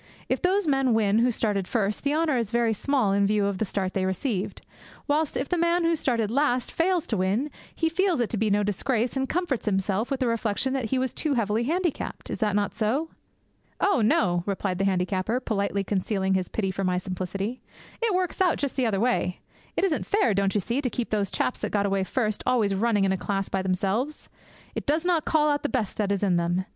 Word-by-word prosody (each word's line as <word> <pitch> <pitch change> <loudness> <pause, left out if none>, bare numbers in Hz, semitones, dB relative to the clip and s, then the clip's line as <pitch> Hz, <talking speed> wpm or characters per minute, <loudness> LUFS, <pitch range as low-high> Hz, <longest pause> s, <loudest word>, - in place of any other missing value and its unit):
'If - - 0
those 380 0 +2
men 270 -4 +3
win 215 -1 +3
who 240 +2 +4
started 205 -5 0
first, 210 -3 0
the 280 - +1
honour 315 -3 +2
is 230 -4 0
very 235 -1 +2
small 240 -2 +1
in 200 0 +3
view 205 0 +2
of 200 -2 -1
the 220 - +1
start 190 -1 -2
they 190 - 0
received; 190 +1 -2 0.4
whilst 300 +1 +1
if 265 - -2
the 355 - 0
man 340 +1 +2
who 335 0 +3
started 230 -8 0
last 255 -2 +1
fails 350 0 +1
to 225 - -1
win, 205 +11 0 0.2
he 325 - +1
feels 355 0 +1
it 240 - 0
to 225 - -1
be 215 +1 +1
no 205 +1 +2
disgrace, 225 +5 0
and 265 0 -1
comforts 335 -10 -1
himself 195 +3 0
with 275 -2 -1
the 260 - +1
reflection 230 +2 0
that 265 -3 -1
he 260 +4 0
was 255 0 -1
too 300 -3 -1
heavily 225 0 +1
handicapped. 340 +2 -2
Is - - -4
that 210 -3 +1
not 205 -1 0
so?' 240 +9 0 0.7
'Oh, 395 -11 +3
no,' 180 -5 +3
replied 195 -2 -1
the 195 - +2
handicapper, 190 +4 0
politely 200 -4 -1
concealing 195 -1 0
his 185 -1 0
pity 195 -3 -1
for 195 +1 -3
my 180 -1 +1
simplicity; 190 +5 -4 0.4
'it 450 -5 +2
works 370 +1 -1
out 360 -3 +3
just 280 -2 -2
the 255 -3 +1
other 200 -3 0
way. 215 -6 +1 0.4
It - - +1
isn't 355 -6 0
fair, 405 - +2
don't 195 0 +1
you 205 - +2
see, 240 +8 -1
to 260 - -1
keep 240 0 -3
those 205 -3 0
chaps - - -1
that - - -2
got 200 -1 +1
away 195 -1 +1
first 215 -1 -1
always 230 -6 +2
running 210 0 +2
in 190 - +2
a 190 - +1
class 195 0 -2
by 190 - 0
themselves. 195 +10 -1 0.4
It - - -5
does 310 +4 +1
not 345 -3 +2
call 300 -1 +3
out 290 - 0
the 290 - -1
best 230 -7 -2
that 205 -2 0
is 200 0 0
in 185 -3 +3
them. 175 +2 0
225 Hz, 230 wpm, -26 LUFS, 195-275 Hz, 0.7 s, who